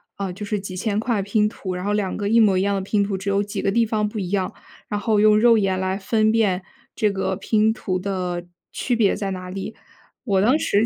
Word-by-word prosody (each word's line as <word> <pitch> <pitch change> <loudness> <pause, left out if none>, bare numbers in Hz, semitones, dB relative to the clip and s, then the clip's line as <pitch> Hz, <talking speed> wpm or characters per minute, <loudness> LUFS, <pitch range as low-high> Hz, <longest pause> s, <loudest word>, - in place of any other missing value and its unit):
啊， 195 -2 -3
就 205 +3 -7
是 210 0 -2
几 195 -1 -7
千 205 +2 -1
块 225 -2 0
拼 210 +2 +1
图， 190 -4 -5
然 180 +1 -5
后 205 - 0
两 200 -3 -1
个 205 - -2
一 230 +3 +4
模 205 -4 +4
一 - - +2
样 200 +1 +1
的 195 - -1
拼 200 +1 +1
图， 200 -1 -2
只 195 +1 -4
有 200 0 +2
几 205 0 -4
个 195 - +1
地 230 +2 +3
方 215 -1 0
不 210 +1 -5
一 185 -1 -4
样， 190 -2 -1 0.4
然 205 - -1
后 210 0 +1
用 210 0 +5
肉 230 0 +6
眼 190 -3 +1
来 190 0 -1
分 215 +2 +1
辨 200 -5 +1 0.3
这 210 -2 +1
个 190 -1 -1
拼 215 +2 +2
图 185 -5 -2
的 180 -2 -3 0.3
区 245 - -1
别 220 -4 +3
在 200 -2 -3
哪 185 -1 -6
里。 195 +3 -6 0.5
我 195 -5 +2
当 250 +8 +4
时 205 -5 +2
200 Hz, 270 characters per minute, -22 LUFS, 190-215 Hz, 0.5 s, 肉